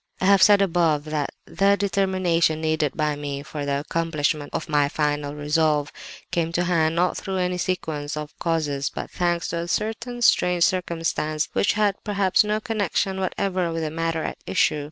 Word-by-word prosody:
"I - - -1
have 200 0 +5
said 205 -1 +7
above 165 -5 +1
that 150 -2 -2 0.2
the 200 +1 +2
determination 185 -5 +1
needed 155 -3 0
by 150 -1 +1
me 145 -1 -5
for 145 -1 -5
the 140 0 0
accomplishment 155 -2 -1
of - - -4
my 145 -2 +2
final 145 -1 -1
resolve, 150 0 +1 0.4
came 170 -2 0
to 175 - +1
hand 165 -2 +1
not 180 +1 +1
through 190 -1 -4
any 180 0 -1
sequence 155 -5 -3
of 150 -1 -6
causes, 150 -4 -1
but - - -7
thanks 175 -1 -1
to 170 - -2
a 170 - -4
certain 235 +5 -2
strange 180 -5 +4
circumstance 165 -4 0
which - - +2
had 205 -2 0
perhaps 200 -3 +2
no 210 +1 0
connection 205 -3 -1
whatever 185 -2 -1
with 165 0 -2
the 155 - -2
matter 165 0 -2
at - - -5
issue. 150 - +2
165 Hz, 175 wpm, -24 LUFS, 150-185 Hz, 0.4 s, said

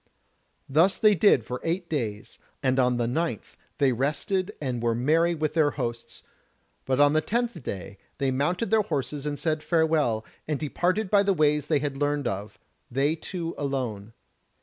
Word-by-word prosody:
Thus 165 +8 +3
they 215 -2 +5
did 165 - +4
for 125 +1 -5
eight 170 +2 -1
days, 115 -9 -4 0.2
and 130 0 +2
on 125 -1 +3
the 120 - 0
ninth 125 - -2 0.2
they 140 -2 +3
rested 155 - -1
and 125 -5 -3
were 115 -1 +1
merry 165 +8 +2
with 155 -1 -1
their 155 -2 +3
hosts: 120 -3 -5 0.6
but 130 0 0
on 145 0 +5
the 155 - +3
tenth 235 -3 -2
day 95 -3 -6 0.2
they 135 -1 0
mounted 175 - 0
their 220 -1 +5
horses 145 -6 -3
and 145 -1 -2
said 155 +1 -1
farewell, 155 -8 +1 0.2
and 150 -3 -1
departed 185 +7 -1
by 205 -1 +6
the 200 -1 +2
ways 150 -2 +2
they 150 - +3
had 140 -1 -3
learned 145 -1 0
of, 100 +2 -4 0.3
they 140 +5 +1
two 165 0 -5
alone. 120 -7 -3
145 Hz, 170 wpm, -26 LUFS, 125-165 Hz, 0.6 s, by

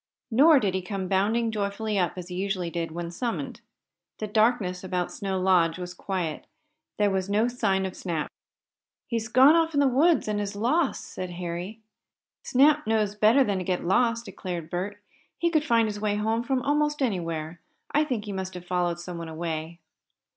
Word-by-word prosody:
Nor 285 +6 +6
did 200 -6 0
he 190 - -1
come 190 0 -4
bounding 215 +5 +1
joyfully 210 0 -2
up, 180 - +1
as 180 0 -7
he 180 - -6
usually 185 -2 -2
did 170 -1 -3
when 170 +1 -5
summoned. 235 +6 -4 0.6
The 215 - -3
darkness 215 -4 +1
about 180 -1 -2
Snow 190 -1 -3
Lodge 180 -3 +3
was 180 -1 -6
quiet. 180 -5 -4 0.5
There 205 -1 +2
was 190 0 -1
no 215 +3 +2
sign 205 -6 0
of 185 - -5
Snap. 165 -5 -3 0.8
"He's 230 -2 -2
gone 260 +6 +6
off 330 -2 +2
in - - +3
the 285 - +5
woods 300 +5 +3
and 210 -1 -1
is 200 0 -4
lost," 260 +8 +1
said 185 -1 -6
Harry. 175 +5 -5 0.6
"Snap 295 +2 +3
knows 215 -2 +1
better 215 +6 +5
than 200 -6 -1
to - - -3
get 180 -1 -2
lost," 230 +5 +2
declared 180 -4 -6
Bert. 195 +4 -3 0.4
"He 340 0 +1
could 310 -3 +2
find 230 -6 +3
his 210 -1 -4
way 210 -1 +1
home 220 +2 0
from 255 +1 -1
almost 295 0 +1
anywhere. 165 -6 -3 0.3
I 300 - +3
think 245 -8 -3
he 205 - -5
must 190 -1 -5
have 180 0 -8
followed 175 -1 -1
someone 170 -1 -6
away." 160 0 -5
200 Hz, 185 wpm, -26 LUFS, 180-235 Hz, 0.8 s, Nor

